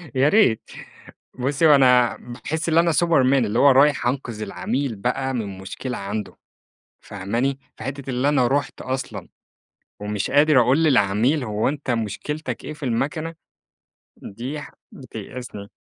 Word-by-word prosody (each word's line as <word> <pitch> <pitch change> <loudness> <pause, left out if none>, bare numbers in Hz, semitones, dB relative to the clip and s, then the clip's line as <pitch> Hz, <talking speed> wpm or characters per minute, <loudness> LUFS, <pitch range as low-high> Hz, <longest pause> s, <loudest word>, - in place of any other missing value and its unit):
يا 135 +3 +4
ريت. 155 - +3 0.7
بُصّي، 140 +5 +2
هو 150 - +8
أنا 125 -3 +4
باحس 145 +7 -5
اللي 165 0 +4
أنا 170 0 +3
Superman، 155 -5 +3
اللي 110 +3 -1
هو 140 - +7
رايح 140 0 +4
أنقذ 120 -4 -3
العميل 125 +5 -2
بقى 130 +5 -2
من 105 -6 -4
مشكلة 120 +6 -6
عنده، 100 +1 -5 0.6
فاهماني؟ 115 +8 -2 0.2
فحتّة 135 +3 -5
اللي 130 +2 0
أنا 140 -4 +3
رُحت 140 +3 -1
أصلًا، 130 0 -5 0.7
ومش 105 -1 -3
قادر 145 -1 +5
أقول 130 +7 +3
للعميل 125 +1 +2
هو 105 -1 0
أنت 145 -1 -4
مشكلتك 120 +7 -3
إيه - - -5
في 150 0 -15
المكنة، 140 +7 -2 0.9
دي 125 +9 -6
حا - - -11 0.2
بتيأسني. 120 -3 -9
130 Hz, 140 wpm, -22 LUFS, 115-145 Hz, 0.9 s, هو